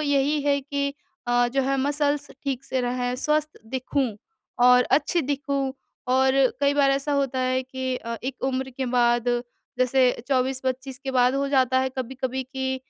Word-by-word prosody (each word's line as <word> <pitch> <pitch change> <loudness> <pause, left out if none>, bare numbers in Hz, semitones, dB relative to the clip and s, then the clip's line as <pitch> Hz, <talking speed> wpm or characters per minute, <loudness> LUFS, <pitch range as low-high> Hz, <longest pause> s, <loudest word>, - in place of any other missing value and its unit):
यही 285 0 +1
है 280 -1 +2
कि 280 0 -2 0.3
अ, 245 0 +3
जो 270 +2 0
है 275 +1 0
मसल्स 285 0 0
ठीक 270 -1 -2
से 260 -1 -1
रहें, 245 0 -1
स्वस्थ 305 +2 0
दिखूँ 260 +2 -1 0.6
और 250 0 +7 0.2
अच्छी 335 +4 -1
दिखूँ। 275 -1 -1 0.4
और 265 0 +3 0.3
कई 280 0 +3
बार 280 -1 +4
ऐसा 275 +2 0
होता 275 -2 0
है 255 0 +1
कि 260 0 -4
अ, 230 -1 -5
एक 260 -1 -5
उम्र 265 0 -1
के 260 0 -4
बाद 240 0 +3 0.5
जैसे 255 0 +4 0.2
24-25 260 0 -1
के 265 - -2
बाद 250 0 +3
हो 275 0 0
जाता 260 -2 +3
है 265 - 0
कभी-कभी 260 +1 -3
कि 265 -1 -1
265 Hz, 170 wpm, -24 LUFS, 255-280 Hz, 0.6 s, और